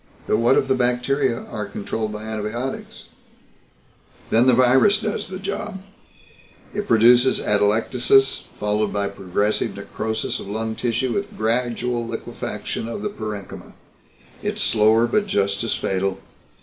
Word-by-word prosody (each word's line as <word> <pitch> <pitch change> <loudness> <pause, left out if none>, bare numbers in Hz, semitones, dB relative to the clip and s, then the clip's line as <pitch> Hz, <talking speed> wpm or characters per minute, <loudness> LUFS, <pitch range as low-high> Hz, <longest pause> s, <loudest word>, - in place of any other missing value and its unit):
"But - - +2
what 120 +4 +4
if - - +2
the 135 - +3
bacteria 125 0 +1
are 105 -2 -5
controlled 105 +2 -4
by 105 0 -6
antibiotics?" 110 +4 -5 1.3
"Then 115 +3 +4
the 130 - +6
virus 130 - +5
does 215 -1 -3
the 185 +1 -6
job. 200 +1 -4 0.9
It 205 0 -3
produces 120 +3 +5
atelectasis 115 +6 +2
followed 105 0 0
by 100 -1 0
progressive 100 +3 -1
necrosis 110 0 -3
of - - -8
lung 110 +2 -2
tissue 120 +2 -1
with 200 +1 -4
gradual 120 +1 0
liquefaction 115 - -5
of 200 - -5
the 210 - -1
parenchyma. 105 - -7 0.7
It's - - -1
slower, 110 +1 +4
but 205 - 0
just 100 - 0
as 115 - 0
fatal. 95 0 -1
115 Hz, 135 wpm, -22 LUFS, 105-130 Hz, 1.3 s, the